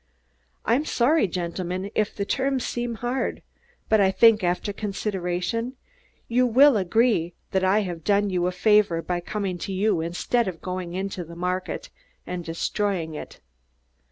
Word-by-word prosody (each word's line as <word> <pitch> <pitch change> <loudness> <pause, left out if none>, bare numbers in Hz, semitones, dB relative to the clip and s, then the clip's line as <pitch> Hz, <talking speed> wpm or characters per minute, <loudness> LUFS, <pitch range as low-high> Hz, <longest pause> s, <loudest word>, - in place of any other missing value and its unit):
"I'm 245 +6 +2
sorry, 290 -3 +2
gentlemen, 180 +2 -3
if 215 -1 0
the 200 - -2
terms 265 +2 0
seem 240 -1 -3
hard, 245 +3 -2 0.4
but 220 -1 +4
I 190 - +5
think, 215 +2 +5
after 180 +3 0
consideration, 200 +2 -2 0.5
you 250 +2 +3
will 265 +3 +6
agree 195 -3 +2 0.2
that 190 -1 +1
I 195 +3 +4
have 175 -5 -5
done 205 +1 +2
you 180 -1 +1
a - - 0
favor 200 -3 +3
by 180 -1 -1
coming 190 0 -3
to 195 - -4
you 190 -2 +1
instead 180 +7 0
of 175 -3 -4
going 180 -1 -5
into 190 -1 -3
the 170 +1 -11
market 185 - -3 0.3
and 180 -1 -4
destroying 170 0 -2
it. 150 - -9
195 Hz, 155 wpm, -25 LUFS, 180-225 Hz, 0.5 s, will